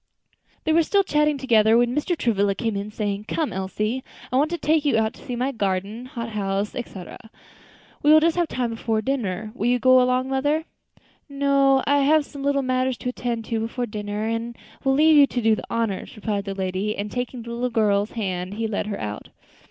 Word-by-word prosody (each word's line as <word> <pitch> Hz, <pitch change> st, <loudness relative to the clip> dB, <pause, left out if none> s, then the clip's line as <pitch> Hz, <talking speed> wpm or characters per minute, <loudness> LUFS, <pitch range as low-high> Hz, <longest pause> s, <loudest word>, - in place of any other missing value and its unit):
They 315 Hz, -, +1 dB
were 335 Hz, -, +5 dB
still 395 Hz, +5 st, +2 dB
chatting 300 Hz, -3 st, +2 dB
together 225 Hz, -4 st, +4 dB
when 240 Hz, +1 st, +2 dB
Mr. 325 Hz, +4 st, 0 dB
Travilla 200 Hz, -6 st, +1 dB
came 225 Hz, -1 st, -2 dB
in, 200 Hz, +1 st, -3 dB
saying, 205 Hz, -1 st, -3 dB
"Come, 310 Hz, +5 st, -2 dB
Elsie, 210 Hz, +6 st, -2 dB, 0.3 s
I -, -, -1 dB
want 290 Hz, +4 st, +3 dB
to 345 Hz, -, -2 dB
take 310 Hz, -2 st, +2 dB
you 285 Hz, -6 st, +2 dB
out 220 Hz, 0 st, +1 dB
to -, -, -16 dB
see 250 Hz, -, -4 dB
my 255 Hz, +3 st, -1 dB
garden, 205 Hz, +1 st, -2 dB
hot 235 Hz, -4 st, -5 dB
house, 200 Hz, -1 st, -2 dB
etc. 195 Hz, -7 st, -7 dB, 0.8 s
We 295 Hz, -, +5 dB
will 310 Hz, -, +9 dB
just 330 Hz, +1 st, +2 dB
have 345 Hz, -1 st, +1 dB
time 245 Hz, -4 st, -2 dB
before 225 Hz, -1 st, -1 dB
dinner. 220 Hz, -6 st, -2 dB
Will 235 Hz, -2 st, -2 dB
you 250 Hz, +1 st, +3 dB
go 255 Hz, +1 st, +5 dB
along, 255 Hz, +1 st, +1 dB
mother?" 290 Hz, +4 st, 0 dB, 0.6 s
"No; 275 Hz, -1 st, +3 dB
I 285 Hz, 0 st, +3 dB
have 295 Hz, +2 st, +4 dB
some 280 Hz, -1 st, -10 dB
little 280 Hz, 0 st, +1 dB
matters 255 Hz, -1 st, 0 dB
to 250 Hz, -, -4 dB
attend 240 Hz, -2 st, -3 dB
to 230 Hz, -1 st, -2 dB
before 230 Hz, +2 st, -2 dB
dinner, 210 Hz, -1 st, -4 dB
and 230 Hz, +1 st, -3 dB, 0.3 s
will 270 Hz, -, +3 dB
leave 310 Hz, +3 st, +5 dB
you 285 Hz, -1 st, +7 dB
to 250 Hz, -, -2 dB
do 225 Hz, -1 st, +3 dB
the -, -, -7 dB
honors," 225 Hz, -5 st, -2 dB
replied 210 Hz, -2 st, -3 dB
the 195 Hz, -1 st, -4 dB
lady; 190 Hz, +2 st, -2 dB
and 205 Hz, +1 st, -4 dB
taking 245 Hz, -1 st, -4 dB
the 235 Hz, -, -8 dB
little 240 Hz, +2 st, -1 dB
girl's 210 Hz, -3 st, +1 dB
hand 185 Hz, -3 st, -3 dB
he 225 Hz, +1 st, -2 dB
led 210 Hz, -1 st, -2 dB
her 205 Hz, -, -4 dB
out. 105 Hz, -1 st, -6 dB
235 Hz, 215 wpm, -23 LUFS, 210-275 Hz, 0.8 s, will